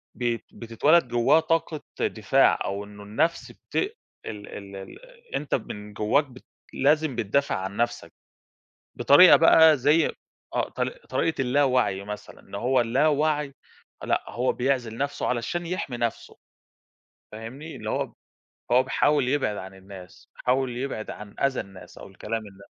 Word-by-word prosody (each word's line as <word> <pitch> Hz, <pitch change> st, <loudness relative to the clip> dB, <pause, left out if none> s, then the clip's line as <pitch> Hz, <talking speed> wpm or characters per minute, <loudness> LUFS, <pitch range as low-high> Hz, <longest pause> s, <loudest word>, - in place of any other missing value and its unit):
ب 120 Hz, -2 st, 0 dB, 0.2 s
بتتولد 130 Hz, +6 st, +2 dB
جواه 120 Hz, +6 st, +4 dB
طاقة 160 Hz, -2 st, -1 dB, 0.2 s
دفاع، -, -, +3 dB
أو 100 Hz, +1 st, -3 dB
إنه 105 Hz, 0 st, -12 dB
النَفْس 160 Hz, +12 st, -1 dB
بت -, -, -19 dB, 0.5 s
ال 105 Hz, -2 st, -7 dB
ال 100 Hz, -1 st, -9 dB
ال 480 Hz, -, -11 dB
أنت 150 Hz, -, -1 dB
من 105 Hz, -3 st, -7 dB
جواك 110 Hz, +9 st, +2 dB
بتد 130 Hz, -2 st, -16 dB, 0.3 s
لازم 150 Hz, -1 st, +2 dB
بتدافع 120 Hz, +6 st, 0 dB
عن 95 Hz, +1 st, -5 dB
نَفسَك، 120 Hz, 0 st, -2 dB, 0.8 s
بطريقة 175 Hz, +6 st, +8 dB
بقى 160 Hz, -2 st, +7 dB
زي 150 Hz, +5 st, +3 dB, 0.4 s
آه -, -, -1 dB
طر -, -, -2 dB
طريقة 480 Hz, -, -2 dB
الْلاوعْي 125 Hz, -6 st, +2 dB
مثلًا، 105 Hz, +1 st, -8 dB
إن -, -, -11 dB
هو 125 Hz, +4 st, +2 dB
الْلاوعْي، 145 Hz, +3 st, +1 dB, 0.5 s
لأ -, -, 0 dB
هو 125 Hz, +2 st, 0 dB
بيعْزِل 125 Hz, -3 st, -1 dB
نَفْسُه 140 Hz, +2 st, -2 dB
علشان 125 Hz, +8 st, -2 dB
يحمي 165 Hz, -8 st, -4 dB
نَفْسُه، 120 Hz, -1 st, -3 dB, 0.9 s
فاهمني؟ 130 Hz, +9 st, -8 dB
اللي -, -, -6 dB
هو -, -, -2 dB, 0.6 s
هو 125 Hz, +1 st, +5 dB
بيحاول 135 Hz, 0 st, +2 dB
يبْعِد 130 Hz, -7 st, 0 dB
عن 95 Hz, +1 st, -8 dB
الناس، 95 Hz, -1 st, -13 dB
بيحاول 125 Hz, -1 st, 0 dB
يبْعِد 125 Hz, -5 st, -4 dB
عن 105 Hz, -1 st, -9 dB
أذى 135 Hz, -2 st, +1 dB
الناس، 95 Hz, -1 st, -14 dB
أو -, -, -10 dB
الكلام 105 Hz, +4 st, -5 dB
الن 100 Hz, -2 st, -14 dB
125 Hz, 140 wpm, -25 LUFS, 105-145 Hz, 0.9 s, بطريقة